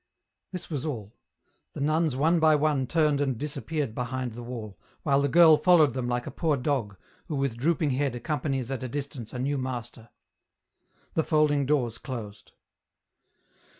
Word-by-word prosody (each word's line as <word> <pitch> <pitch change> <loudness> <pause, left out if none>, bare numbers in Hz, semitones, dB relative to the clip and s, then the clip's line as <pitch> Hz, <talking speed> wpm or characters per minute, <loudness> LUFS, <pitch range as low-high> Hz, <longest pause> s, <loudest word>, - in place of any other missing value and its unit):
This 180 -2 -5
was 140 -4 -2
all: 115 -9 -5 0.6
the - - -7
nuns 155 0 +1
one 160 +5 +3
by 155 -1 +5
one 145 -3 +1
turned 150 -3 +2
and 135 -4 0
dis 145 +3 -4
appeared 150 -8 -3
behind 125 +1 -3
the 120 +2 -8
wall, 115 -4 -7 0.2
while 140 -2 +3
the 140 - +2
girl 160 +1 +7
followed 160 -7 +5
them 125 -1 -2
like 120 0 -1
a - - -5
poor 155 -4 0
dog, 125 -7 -1 0.3
who 155 - -3
with 135 -4 -1
drooping 150 +3 +1
head 135 -1 0
accompanies 135 -2 -2
at 135 - -3
a 130 - -3
distance 140 -4 -5
a - - -6
new 140 +2 -1
master. 120 -3 -6 1.0
The 160 - +1
folding 150 -3 +2
doors 125 -6 0
closed. 110 -6 -8
140 Hz, 170 wpm, -27 LUFS, 125-150 Hz, 1.0 s, girl